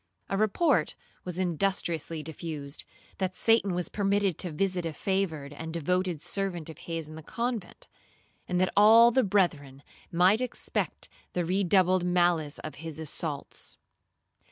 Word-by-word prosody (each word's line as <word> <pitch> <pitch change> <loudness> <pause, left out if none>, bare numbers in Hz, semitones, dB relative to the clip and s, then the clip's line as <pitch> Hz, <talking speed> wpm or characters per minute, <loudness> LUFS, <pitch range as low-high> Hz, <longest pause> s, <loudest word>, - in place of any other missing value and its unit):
A - - 0
report 215 - +2 0.3
was 180 -1 -5
industriously 170 -3 -1
diffused, 150 -2 -6 0.3
that 185 -1 -1
Satan 225 -5 +3
was 180 -1 -1
permitted 200 -3 0
to 180 - 0
visit 180 +3 -1
a 165 -1 -3
favoured 160 -7 -2
and 160 +2 -6
devoted 180 +1 0
servant 175 -5 -3
of - - -14
his 165 -2 -3
in 155 - -10
the 160 - -8
convent, 235 +2 -4 0.6
and 180 -1 0
that 185 0 +1
all 225 +3 +8
the 260 - +4
brethren 150 -9 0 0.3
might 185 +6 +4
expect 250 -1 -2 0.3
the 175 -1 0
redoubled 185 0 +3
malice 175 -4 +2
of 155 - -7
his 160 -2 -6
assaults. 155 -1 -4
180 Hz, 140 wpm, -28 LUFS, 160-195 Hz, 0.6 s, all